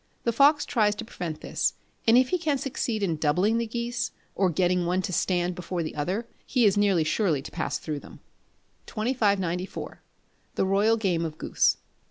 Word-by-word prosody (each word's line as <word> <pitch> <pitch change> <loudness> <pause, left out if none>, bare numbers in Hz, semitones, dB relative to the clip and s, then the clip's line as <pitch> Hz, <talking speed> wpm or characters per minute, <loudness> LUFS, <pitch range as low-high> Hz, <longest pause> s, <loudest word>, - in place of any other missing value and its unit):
The 235 - +1
fox 290 +5 +5
tries 210 -3 +2
to 225 - -6
prevent 170 -8 -6
this, - - -1 0.3
and 225 +2 +7
if 255 0 +4
he 365 - +1
can 305 -4 +1
succeed 240 -5 -2
in 170 -5 0
doubling 180 +10 +2
the 235 - -1
geese, 235 +1 -2 0.2
or 190 -2 +2
getting 180 +1 +1
one 185 +2 +1
to 185 - -3
stand 175 +1 +1
before 175 0 -4
the 155 - -5
other, 185 +10 -2 0.2
he 250 -3 +2
is 200 - +4
nearly 200 -5 +3
sure 160 -1 +1
to 135 - -9
pass 160 - -2
through 150 -2 -4
them. - - -14 0.7
2594. 200 -6 -1 0.5
The - - +1
Royal 205 +4 +3
Game 180 -6 0
of 155 -2 -4
Goose. - - +2
195 Hz, 185 wpm, -26 LUFS, 175-230 Hz, 0.7 s, and